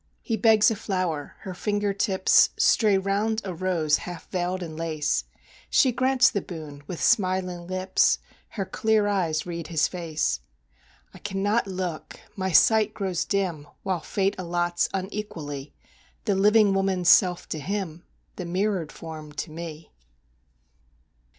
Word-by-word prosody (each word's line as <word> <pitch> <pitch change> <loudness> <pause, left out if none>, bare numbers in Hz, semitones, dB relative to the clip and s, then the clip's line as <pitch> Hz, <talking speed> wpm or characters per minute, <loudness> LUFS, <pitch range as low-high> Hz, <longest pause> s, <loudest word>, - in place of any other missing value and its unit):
He 230 - -1
begs 220 0 +5
a - - -1
flower; 185 -7 -3
her 190 - -6
finger 205 +2 -1
tips 195 -1 +4
Stray 210 -4 +4
round 200 +3 0
a 190 - -3
rose 165 -4 +1
half 175 -2 -8
veiled 180 0 -1
in 160 -2 -7
lace; 155 -2 -1 0.4
She 260 - +4
grants 255 +1 +3
the 200 - -1
boon 155 -5 -9
with 180 - -5
smiling 185 -3 +1
lips, 185 +1 +2 0.3
Her 195 -3 -4
clear 215 +2 +1
eyes 170 -6 0
read 170 -2 -5
his 160 -2 +2
face. 160 - -2 0.7
I - - -12
cannot 205 +2 0
look 185 -4 -5 0.2
my 190 -1 -2
sight 215 +4 +4
grows 190 -4 -2
dim 180 -7 -1 0.2
While 185 -3 -1
Fate 195 +5 0
allots, 175 -1 0
unequally, 170 -8 -5 0.5
The 205 - +2
living 205 +1 +4
woman's 195 -2 0
self 180 -1 +5
to 155 - -3
him, 180 -1 -4 0.3
The 180 - -4
mirrored 185 -2 -1
form 155 -2 -9
to 150 +2 -5
me. 165 -1 -8
185 Hz, 140 wpm, -25 LUFS, 165-200 Hz, 0.7 s, begs